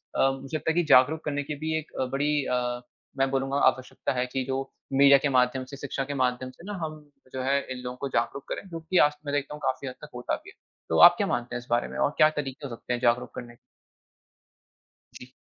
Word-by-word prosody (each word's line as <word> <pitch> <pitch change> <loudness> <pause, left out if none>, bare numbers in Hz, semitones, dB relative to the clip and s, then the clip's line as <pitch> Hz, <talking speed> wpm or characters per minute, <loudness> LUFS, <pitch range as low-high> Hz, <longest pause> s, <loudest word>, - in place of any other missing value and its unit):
अ, 135 - +4
मुझे 135 +3 -4
लगता 160 - -1
है - - -3
कि 175 - +3
जागरूक 145 +5 +5
करने 145 -1 -1
की 150 +1 -5
भी 160 +1 -1
एक 160 0 -7 0.2
बड़ी 145 +2 +1
अ, 125 -1 -1 0.4
मैं 135 0 +2
बोलूँगा 135 +1 0
आवश्यकता 130 +1 -1
है 125 0 0
कि 130 - 0
जो 135 0 -1 0.3
मीडिया 140 +1 +7
के 140 +1 0
माध्यम 130 0 +2
से 140 +2 -10
शिक्षा 140 -1 -3
के 145 - -4
माध्यम 130 -1 0
से 170 - -17
ना 205 - -5
हम 155 -1 -5 0.3
जो 130 - -3
है 140 +2 +2
इन 130 - -4
लोगों 125 0 -5
को 140 - -1
जागरूक 125 +3 -1
करें, - - -5
क्योंकि 165 +1 -2
आज 150 - -6
मैं 145 - -3
देखता 145 0 -1
हूँ 150 - -9
काफ़ी 130 0 -2
हद 130 - -6
तक 150 - -10
होता 125 - -2
भी - - -13
है, - - -16 0.3
तो - - +1
आप - - +2
क्या - - 0
मानते 120 0 -2
हैं - - -2
इस 120 - -17
बारे 120 0 +1
में? - - -8
और - - +2
क्या 155 - +7
तरीके 140 -2 -5
हो 120 - -6
सकते 125 - -4
हैं 120 - -1
जागरूक 120 0 +2
करने 120 -1 -8
के? - - -29 1.6
जी। 125 +1 -11
135 Hz, 250 wpm, -27 LUFS, 125-145 Hz, 1.6 s, मीडिया